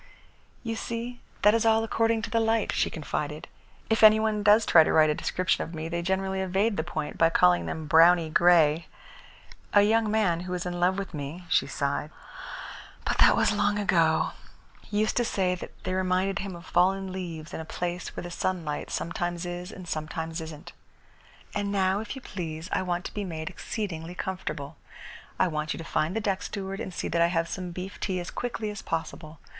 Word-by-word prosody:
"You 230 -1 -2
see, 235 +2 -5 0.2
that 210 - +7
is 230 - +2
all 225 0 +4
according 225 0 +1
to 225 - -4
the 230 - +2
light," 225 -1 +1
she - - +1
confided. 150 -1 -4 0.4
"If 220 - +1
any 215 0 +8
one 220 -1 0
does 210 +2 +5
try 160 - +7
to - - 0
write 155 -1 +5
a - - +2
description 185 +4 0
of 165 - -8
me, 160 +1 -4
they 170 0 -2
generally 190 +1 -1
evade 195 +4 +1
the 160 - -1
point 155 -3 -5
by 165 - +6
calling 90 - +4
them 155 - -4
browny 165 +2 +6
grey. 165 -1 +4 0.9
A 205 - +7
young 220 +1 +3
man 205 -6 +2
who 180 +1 -6
was 180 -1 -3
in 175 0 -3
love 180 +2 +2
with 195 -2 -5
me," 150 +4 -6
she - - +3
sighed, 140 +1 -2 1.0
"but - - -1
that - - +7
was - - +3
long 205 0 +1
ago, 205 -1 +2 0.6
used 215 +1 0
to 240 - +3
say 190 -5 0
that 180 - -7
they 185 - -2
reminded 185 +1 +1
him 195 -2 -5
of 170 0 -11
fallen 190 +2 +2
leaves 170 -4 -6
in - - -4
a - - -4
place 175 +2 -4
where - - -5
the 175 - -7
sunlight 170 -5 -2
sometimes 175 +1 -3
is 175 +2 -5
and 185 -2 -10
sometimes 160 +1 -4
isn't. 160 -2 -9 0.8
And 205 -1 -1
now, 190 0 +2
if 220 +4 -5
you 265 - -9
please, 165 -3 -6
I - - +1
want 180 -1 -2
to - - -6
be 205 - -3
made 165 -1 -5
exceedingly 175 -4 -5
comfortable. 155 -6 -5 0.6
I - - +3
want 155 -2 -2
you - - -8
to 165 - -6
find 165 +2 -1
the 225 - 0
deck 200 -2 -1
steward 195 -1 -5
and 190 - -4
see - - -3
that 170 - +1
I 170 - +6
have 165 -1 0
some 180 0 -5
beef 180 +3 -7
tea 185 -2 -1
as 175 - -6
quickly 230 -3 -3
as 205 - -7
possible. 160 -1 -4
180 Hz, 205 wpm, -27 LUFS, 165-205 Hz, 1.0 s, any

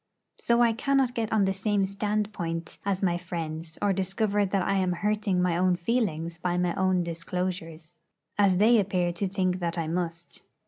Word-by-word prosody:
So 235 0 +3
I 230 -1 +4
cannot 270 +1 +1
get 230 -3 -2
on 215 -3 +3
the 190 - +1
same 195 0 +1
standpoint 200 -4 -3
as 195 -1 -1
my 175 -2 +1
friends, 165 -2 -5
or 200 -1 +3
discover 200 +2 0
that 190 0 0
I 195 - 0
am 185 -1 +1
hurting 205 0 0
my 180 -2 +1
own 180 +1 +3
feelings 170 -5 -1
by 175 0 -1
my 180 -1 +1
own 185 -2 +1
disclosures, 170 -1 -4 0.4
as 200 -3 +3
they 225 +4 +5
appear 180 -3 0
to 195 +3 -2
think 185 -1 0
that 170 -1 -2
I 165 -2 -1
must. 170 0 -4
185 Hz, 180 wpm, -27 LUFS, 170-205 Hz, 0.4 s, they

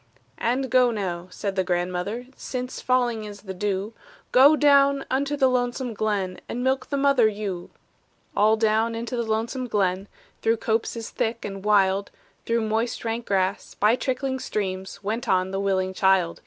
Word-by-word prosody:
"And 255 +2 0
go 250 -1 +5
now," 185 -6 -3
said 195 +1 -4
the 190 - +1
grandmother, 180 +6 -2
"Since 255 0 -5
falling 245 -3 +1
is 205 -1 -9
the 190 -2 -7
dew, 200 +2 -2 0.4
Go 280 +4 +7
down 280 -2 +4
unto 280 +2 0
the 270 -2 +4
lonesome 245 -1 -1
glen, 205 -4 -2
And 245 - -3
milk 260 0 0
the 280 - -2
mother 275 -4 +4
ewe!" 200 -4 -4 0.7
All 215 +2 +4
down 220 +1 +2
into 235 +2 -4
the 240 - 0
lonesome 230 +4 -1
glen, 195 -3 0 0.3
Through 225 +1 +2
copses 225 0 -2
thick 230 +1 -2
and 195 -1 -6
wild, 200 -1 +3 0.4
Through 230 0 +1
moist 225 +2 -1
rank 230 +1 -3
grass, 190 -1 -1
by 215 +3 +3
trickling 260 +1 -2
streams, 190 -3 -4
Went 220 +4 -3
on 185 0 +2
the 195 - -2
willing 190 -1 0
child. 190 -3 +2
220 Hz, 165 wpm, -25 LUFS, 195-250 Hz, 0.7 s, Go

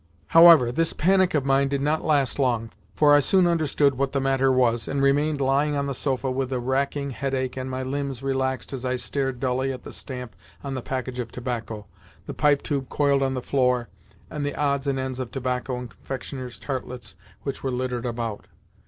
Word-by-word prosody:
However, 165 -7 +8
this 165 +6 0
panic 185 +1 +3
of 140 -3 +1
mine 135 0 +3
did 140 0 -1
not 150 +3 0
last 145 -4 +1
long, 120 -4 0 0.2
for 150 -1 +5
I 145 - +7
soon 185 +6 +3
understood 155 -4 +2
what 135 -1 0
the 140 - +1
matter 135 0 +2
with 130 - +1
me - - +5
was, 115 -2 0
and 140 - -1
remained 145 +2 +2
lying 140 +2 +2
on 140 0 0
the 140 - -2
sofa 130 0 -1
with 130 0 -2
a 130 - 0
racking 140 +2 -1
headache 130 0 -2
and 130 0 -4
my 130 0 -3
limbs 135 -1 -3
relaxed 130 -1 -1
as 130 -2 -5
I 130 0 0
stared 135 0 -2
dully 130 +1 0
at 130 -1 -7
the - - -9
stamp 125 -7 -8 0.3
on 140 -1 -4
the 130 - -3
package 130 0 -4
of 120 -2 -4
tobacco, 115 -4 -5 0.4
the - - -6
Pipe 145 -2 +2
tube 140 -4 -2
coiled 140 -2 +2
on 135 -1 0
the 125 - -4
floor, 125 -3 +1 0.4
and 150 -2 -5
the 145 - -2
odds 140 -1 0
and 135 -1 0
ends 130 -1 -3
of 130 -2 -4
tobacco 125 0 -2
and 125 -1 -7
confectioner's 130 -2 -7
tartlets 125 -2 -5 0.3
which 140 -1 -4
were 135 - -2
littered 125 -1 -2
about. 115 -3 -4
135 Hz, 210 wpm, -25 LUFS, 125-140 Hz, 0.4 s, However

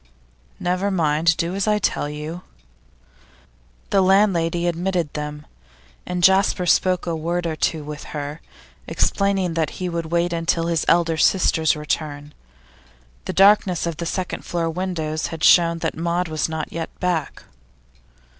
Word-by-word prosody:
'Never 185 +3 0
mind; 165 -2 +2
do 170 +2 -1
as 195 +1 -1
I 210 0 +3
tell 165 -7 -1
you.' 150 +4 -6 1.5
The 195 - +4
landlady 185 -3 +2
admitted 175 -2 -1
them, 150 0 -6 0.6
and 180 -1 -3
Jasper 190 -1 +4
spoke 185 +1 +2
a 170 -1 -2
word 170 +2 -2
or 160 -1 -2
two 155 0 -1
with 150 0 -8
her, 145 +1 -6 0.5
explaining 195 -3 0
that 160 -2 0
he 180 -1 -3
would 170 -1 -3
wait 170 +1 0
until 165 0 0
his 165 -2 0
elder 165 -1 +3
sister's 160 -2 +3
return; 150 -1 -4 0.9
the - - -3
darkness 195 -3 +4
of 170 -2 -3
the 170 - -4
second 185 +1 -3
floor 165 -1 -2
windows 160 -3 -3
had 160 -1 -7
shown 170 -1 +5
that - - -1
Maud 170 +2 -1
was 155 0 -1
not 160 -1 -5
yet 165 -1 -4
back. 175 -5 -2
170 Hz, 145 wpm, -22 LUFS, 160-180 Hz, 1.5 s, shown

